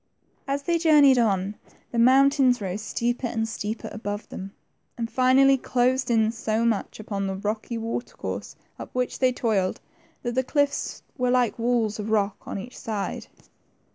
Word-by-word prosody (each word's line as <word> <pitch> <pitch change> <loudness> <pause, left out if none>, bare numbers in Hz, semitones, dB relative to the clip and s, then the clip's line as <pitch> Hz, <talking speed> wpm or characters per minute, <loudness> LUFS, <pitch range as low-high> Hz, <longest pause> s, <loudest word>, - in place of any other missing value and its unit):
As 280 +1 -1
they 340 +2 +1
journeyed 295 -5 +6
^n, 200 -4 +1 0.4
the 235 - -1
mountains 265 +1 +5
rose 195 0 -4
steeper 240 +3 -1
and 225 -1 -2
steeper 220 0 -4
above 205 -1 -5
them, 195 +1 -7 0.5
and 230 -1 -3
finally 265 +1 +5
closed 255 +1 +1
in 220 -2 +3
so 225 0 -1
much 225 -2 -1
upon 200 -2 -3
the 190 - -2
rocky 215 +4 -3
water 230 +2 -4
course - - -5 0.2
up - - -7
which 250 0 -2
they 255 -1 +4
toiled, 215 -7 0 0.4
that 240 -1 -2
the 260 +2 +1
cliffs 285 +2 -1 0.2
were 250 0 +2
like 245 -3 +2
walls 230 -3 +1
of 210 +1 -4
rock 205 -2 0
on - - -4
e^lch 220 +6 -8
side. 215 -3 -4
235 Hz, 165 wpm, -25 LUFS, 215-255 Hz, 0.5 s, journeyed